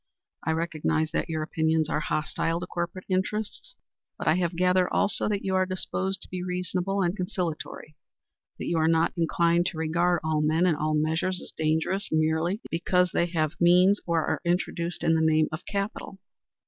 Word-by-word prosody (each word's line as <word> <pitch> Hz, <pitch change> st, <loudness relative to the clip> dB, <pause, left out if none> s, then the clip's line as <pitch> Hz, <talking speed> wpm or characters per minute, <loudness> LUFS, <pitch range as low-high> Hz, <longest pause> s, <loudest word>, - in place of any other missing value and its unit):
I -, -, -2 dB
recognize 160 Hz, -1 st, -1 dB
that 165 Hz, -, -2 dB
your 155 Hz, -1 st, -1 dB
opinions 160 Hz, 0 st, +1 dB
are 150 Hz, -, 0 dB
hostile 160 Hz, +2 st, -1 dB
to 180 Hz, -, -4 dB
corporate 175 Hz, +1 st, -4 dB
interests, 200 Hz, +3 st, -2 dB, 0.4 s
but -, -, -5 dB
I 155 Hz, -, +6 dB
have 175 Hz, -2 st, -1 dB
gathered 180 Hz, +1 st, +3 dB
also 205 Hz, +1 st, +2 dB
that 205 Hz, -1 st, -2 dB
you 190 Hz, -, 0 dB
are 185 Hz, 0 st, +2 dB
disposed 190 Hz, +1 st, -2 dB
to -, -, -12 dB
be 180 Hz, -1 st, -4 dB
reasonable 180 Hz, +2 st, -1 dB
and 175 Hz, +1 st, 0 dB
conciliatory; 180 Hz, -5 st, -4 dB, 0.6 s
that -, -, -5 dB
you 170 Hz, -, 0 dB
are 160 Hz, -, +3 dB
not 165 Hz, 0 st, +2 dB
inclined 170 Hz, +1 st, +2 dB
to 165 Hz, -, -4 dB
regard 170 Hz, +2 st, +1 dB
all 155 Hz, -1 st, +1 dB
men 160 Hz, +3 st, +2 dB
and 175 Hz, -4 st, +3 dB
all 155 Hz, +1 st, 0 dB
measures 160 Hz, +4 st, 0 dB
as -, -, -9 dB
dangerous, 160 Hz, +5 st, 0 dB
merely 160 Hz, +6 st, +1 dB
because 180 Hz, +1 st, +2 dB
they 170 Hz, -, +1 dB
have 160 Hz, -3 st, -1 dB
means 180 Hz, +4 st, +5 dB
or 165 Hz, -2 st, +1 dB
are -, -, -1 dB
introduced 175 Hz, -1 st, -1 dB
in 165 Hz, -, +3 dB
the 160 Hz, -, +2 dB
name 155 Hz, -1 st, +3 dB
of 155 Hz, +3 st, -5 dB
capital." 200 Hz, -1 st, -4 dB
170 Hz, 185 wpm, -27 LUFS, 160-185 Hz, 0.6 s, I